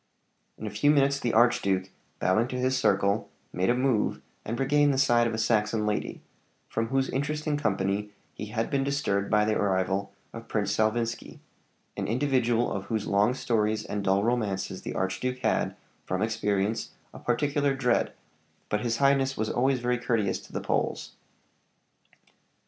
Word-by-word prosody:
In - - -7
a 105 - -4
few 110 +8 +2
minutes 140 -1 +3
the 120 -3 0
archduke, 100 -6 +2 0.3
bowing 110 +6 +2
to 125 - -5
his 130 +1 +1
circle, 100 -4 +1 0.2
made 90 +4 0
a 120 - +4
move 125 -4 +1 0.2
and 115 +2 -4
regained 145 +2 +3
the 135 - 0
side 120 -3 +4
of 115 - -2
a - - -3
Saxon 110 -1 +1
lady, 105 0 -2 0.4
from 115 0 -2
whose 135 +2 0
interesting 150 +2 -1
company 105 -5 -1 0.2
he 105 - -6
had 115 +1 -2
been 140 -1 +1
disturbed 120 -8 0
by 105 0 +3
the 110 0 +1
arrival 95 0 0 0.2
of 115 0 -9
Prince 105 -1 0
Salvinski 115 +2 -1 0.6
an - - -3
individual 120 -1 +1
of - - -3
whose 110 -3 -2
long 105 +5 +2
stories 110 -4 0
and 105 -1 -3
dull 95 +1 +2
romances 105 -5 -1
the - - -6
archduke 95 +7 -1
had, - - +1 0.3
from 95 +2 0
experience, 105 -1 -1 0.2
a - - -10
particular 140 +3 +1
dread; 125 -3 +1 0.6
but 105 - 0
his 115 0 -1
highness 135 0 +2
was 110 - -1
always 130 +1 +1
very 125 0 0
courteous 110 -5 0
to - - -16
the - - -3
Poles. - - -1
115 Hz, 165 wpm, -27 LUFS, 105-130 Hz, 0.6 s, a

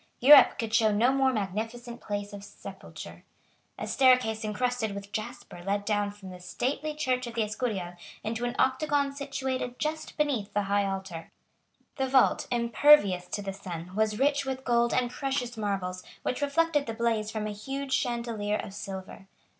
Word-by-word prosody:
Europe 285 +3 +8
could 225 -1 -3
show 220 -1 +4
no 225 +5 +3
more 270 -1 +3
magnificent 230 +3 -4
place 205 -1 -4
of 200 -1 -8
sepulture. - - -10 0.5
A - - -4
staircase 250 -5 +3
encrusted 220 0 -1
with 200 0 -8
jasper 210 -4 -6
led 200 +2 -1
down 205 -1 +1
from 200 -2 -10
the 180 - -10
stately 275 +11 -3
church 255 -4 -1
of 235 - -8
the 230 - +2
Escurial 210 -5 -3 0.3
into 225 +2 -3
an 240 0 -2
octagon 280 +1 +1
situated 265 -3 -3
just 310 +1 -3
beneath 275 -9 0
the 205 - +2
high 200 0 +1
altar. 190 -4 -5 0.7
The 265 -1 0
vault, 260 0 +3
impervious 235 -6 +4
to 205 - -4
the 195 0 -4
sun, 180 -2 -7
was 215 0 +1
rich 285 +2 +2
with 265 -1 -4
gold 235 -1 +3
and 245 -1 +1
precious 265 -3 -2
marbles, 195 -4 -2 0.2
which 255 - -2
reflected 295 0 +1
the 225 - -4
blaze 225 -2 0
from 215 -1 -3
a 215 - -3
huge 270 +6 -5
chandelier 230 -5 -1
of 195 - -7
silver. 195 -1 -8
230 Hz, 170 wpm, -28 LUFS, 205-265 Hz, 0.7 s, Europe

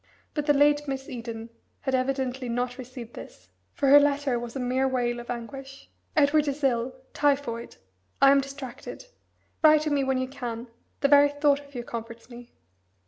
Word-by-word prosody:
But 295 -1 -3
the 290 - +6
late 290 +1 +3
Miss 270 -1 -4
Eden 230 -4 -7 0.3
had 265 - -2
evidently 260 -1 -1
not 245 +2 -2
received 250 -2 -9
this, 95 +1 -12 0.2
for 275 - 0
her 290 +1 +10
letter 285 -3 +1
was 235 +1 -7
a - - -2
mere 255 +1 +1
wail 240 -2 -1
of 240 - -10
anguish. 270 +3 -7 0.3
"Edward 300 0 +4
is 285 +1 -3
ill 250 -1 +1 0.2
typhoid. 275 -5 0 0.4
I 275 - +7
am 280 0 +5
distracted. 275 - -8 0.6
Write 310 -1 +6
to 305 0 -2
me 285 -1 +2
when 265 0 +1
you 260 0 -1
can. 245 -3 -6 0.3
The 280 - +4
very 285 0 +6
thought 290 0 +2
of 285 -1 -16
you 240 - -4
comforts 230 +1 -8
me." 240 0 -11
265 Hz, 180 wpm, -26 LUFS, 240-285 Hz, 0.6 s, her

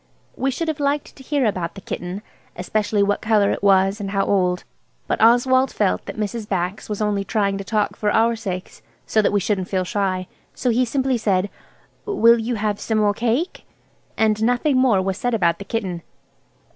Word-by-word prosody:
We 270 - 0
should 325 +5 -3
have 315 -1 -2
liked 285 0 -1
to - - -14
hear 280 0 0
about 185 -5 -2
that 195 - -11
kitten–especially 200 +2 -3
what 205 0 0
colour 215 -2 +3
it - - -3
was 195 +1 +3
and 195 - -3
how 195 0 0
old–but 180 -3 -2
Oswald 255 +3 +4
felt 205 -3 0
that - - -6
Mrs. 215 +1 -3
Bax 185 +2 -2
was 210 0 -2
only 205 -1 0
trying 200 0 0
to - - -4
talk 210 +1 -1
for 210 - -1
our 230 +2 +3
sakes, 190 -5 -6 0.2
so 220 - +2
that - - +1
we 205 - +2
shouldn't 190 -1 -1
feel 185 -2 0
shy, 185 -1 -1 0.3
so 250 - 0
he 250 +2 +2
simply 260 0 0
said, 195 -2 0 0.6
"Will 235 - +5
you 235 +2 -2
have 210 -1 -1
some 220 - -1
more 210 -1 +3
cake?" 240 - -2 0.5
and 215 -1 +2
nothing 245 +5 +2
more 230 -8 +3
was 195 +1 -2
said 245 -1 0
about 170 -5 +1
the 200 - -7
kitten. 190 -5 -3
210 Hz, 190 wpm, -21 LUFS, 195-235 Hz, 0.6 s, Will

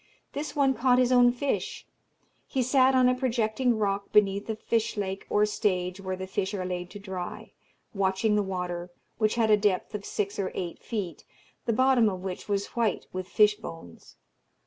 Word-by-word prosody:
This 295 +2 -4
one 275 -2 +3
caught 250 0 +3
his 255 0 +3
own 245 -1 +6
fish; 265 +3 -3 0.6
he 260 - 0
sat 260 +1 +4
on 255 -1 +5
a 250 - +4
projecting 245 -1 0
rock 200 -1 -1
beneath 200 0 +3
a 220 - -1
fish 225 0 -1
lake 195 -1 -3
or 210 0 +3
stage, 185 -3 -1
where 185 -1 -3
the 190 0 -5
fish 190 +1 -2
are 185 -2 -3
laid 180 -1 -4
to 205 - -9
dry, 190 -3 -6 0.4
watching 195 +2 +1
the 210 - +3
water, 180 -2 -4 0.3
which 215 0 +2
had 225 -2 +2
a 210 - +7
depth 205 0 0
of 210 -1 -4
six 205 0 -3
or 190 -2 -1
eight 175 -2 -4
feet, 195 -8 -4 0.4
the 230 - +2
bottom 255 -2 +4
of 185 -2 -6
which 190 +1 -6
was 200 0 0
white 230 -3 0
with 185 0 -4
fish 210 +1 +4
bones. 165 - -11
210 Hz, 190 wpm, -27 LUFS, 190-235 Hz, 0.6 s, a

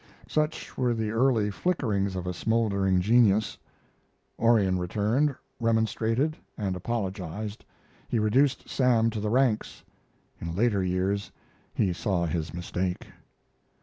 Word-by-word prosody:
Such 155 0 -2
were 125 -2 +2
the 110 -1 -2
early 115 -3 +2
flickerings 100 - -1
of 90 -1 -4
a 90 - -2
smoldering 100 -3 +1
genius. 110 0 +3 0.8
Orion 105 -6 +3
returned, 110 +10 +1 0.2
remonstrated, 115 +5 +1 0.2
and 95 -3 -2
apologized. 100 0 -4 0.5
He 120 - 0
reduced 125 +6 +2
Sam 120 -3 +2
to 110 - -4
the 105 +1 -1
ranks. 120 -2 +1 0.6
In 85 0 -5
later 105 -2 +2
years 95 +2 -1 0.4
he 95 -3 +1
saw 90 -1 0
his 80 0 -2
mistake. 90 +1 -3
105 Hz, 115 wpm, -27 LUFS, 95-115 Hz, 0.8 s, genius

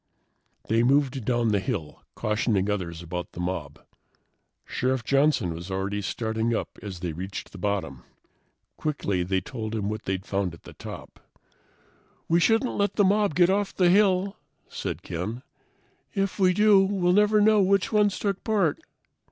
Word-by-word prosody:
They 115 +1 +3
moved 135 -1 +2
down 120 -1 +1
the 105 -2 +2
hill, 95 - -4
cautioning 105 -2 0
others 85 -4 -4
about 90 +1 -5
the - - -9
mob. 85 -5 -4 0.8
Sheriff 130 -1 -1
Johnson 140 - +2
was 85 +3 -8
already 95 +2 -2
starting 110 +3 -1
up - - -5
as 95 -4 -7
they 90 -3 -3
reached 95 +5 -6
the 100 - -11
bottom. 90 -9 -2 0.8
Quickly, 100 -12 -1
they 95 +1 0
told 110 +1 -5
him 105 -2 -2
what 110 +1 -5
they'd 95 0 -2
found 95 -3 -2
at - - -20
the - - -12
top. - - -10 1.1
"We 170 +1 +3
shouldn't 225 +7 +2
let 200 0 0
the 205 - +4
mob 205 -3 +2
get 175 +1 +5
off 200 0 0
the 180 -2 +4
hill," 195 0 +3 0.3
said - - -5
Ken. 105 +9 -5 0.7
"If 195 0 -1
we 185 -1 +5
do, 210 +1 +5
we'll 190 -2 +1
never 210 +2 +4
know 210 0 +5
which 195 0 +2
ones 210 -3 +3
took 200 -2 -2
part." 200 -9 +1
120 Hz, 160 wpm, -26 LUFS, -, 1.1 s, get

